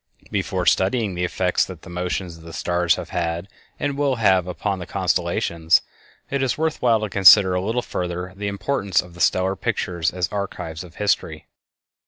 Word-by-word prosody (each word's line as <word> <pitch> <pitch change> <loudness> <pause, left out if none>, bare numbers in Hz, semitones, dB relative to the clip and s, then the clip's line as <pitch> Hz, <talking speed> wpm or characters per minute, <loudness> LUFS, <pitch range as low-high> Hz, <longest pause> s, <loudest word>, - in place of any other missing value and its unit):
Before - - -1
studying 100 +1 +2
the 90 0 -2
effects 90 0 +1
that 90 -4 -10
the - - -11
motions 90 0 -3
of 80 - -15
the 85 0 -10
stars 90 -1 +1
have - - -7
had 85 +1 -2 0.3
and 145 -1 -1
will 140 -2 +1
have 95 -6 +3
upon 95 +2 -2
the 90 - -7
constellations, 85 0 +1 0.5
it 140 0 0
is 130 -2 0
worth 160 0 -1
while 115 -3 +3
to 110 - -1
consider 95 -1 +7
a 90 - 0
little 115 +5 -1
further 90 0 -4
the 100 +1 -4
importance 100 -2 0
of 90 -1 -15
the 85 - -9
stellar 95 +3 +2
pictures 85 -2 -1
as 90 -1 -2
archives 95 -5 -5
of 85 -2 -14
history. 105 -1 -1
95 Hz, 185 wpm, -22 LUFS, 90-105 Hz, 0.5 s, consider